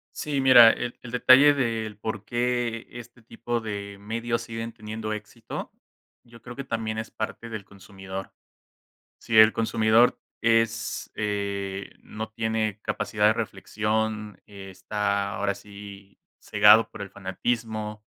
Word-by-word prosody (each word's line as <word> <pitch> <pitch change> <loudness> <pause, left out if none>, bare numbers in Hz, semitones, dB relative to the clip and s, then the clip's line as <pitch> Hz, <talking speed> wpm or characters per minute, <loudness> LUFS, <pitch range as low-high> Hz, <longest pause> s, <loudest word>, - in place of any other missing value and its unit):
Sí, 145 -3 -2
mira, 125 -3 +9
el 120 +1 -2
el 120 - -10
detalle 130 +4 +6
del 115 -5 -2
porqué 115 +2 -2
este 120 0 -12
tipo 120 +1 -4
de 100 -2 -6
medios 115 +3 -3
siguen 115 0 -6
teniendo 110 0 -5
éxito, 110 +2 -8 0.5
yo 115 -1 -17
creo 120 - -9
que 140 - -6
también 110 -3 -3
es 110 - -5
parte 115 +1 -5
del 110 -3 -6
consumidor. 95 -1 -9 0.9
Si 110 - 0
el 110 0 +8
consumidor 115 +1 +3 0.2
es, 115 0 0
eh, 100 -2 -3
no 110 +1 -6
tiene 110 -2 -1
capacidad 105 0 0
de 110 - +4
reflexión, 105 0 -3
está 100 +1 -3
ahora 100 - -1
sí 100 -1 -12 0.2
cegado 105 +2 +6
por 110 - -10
el 100 - -9
fanatismo, 105 +2 -3
110 Hz, 130 wpm, -26 LUFS, 105-115 Hz, 0.9 s, mira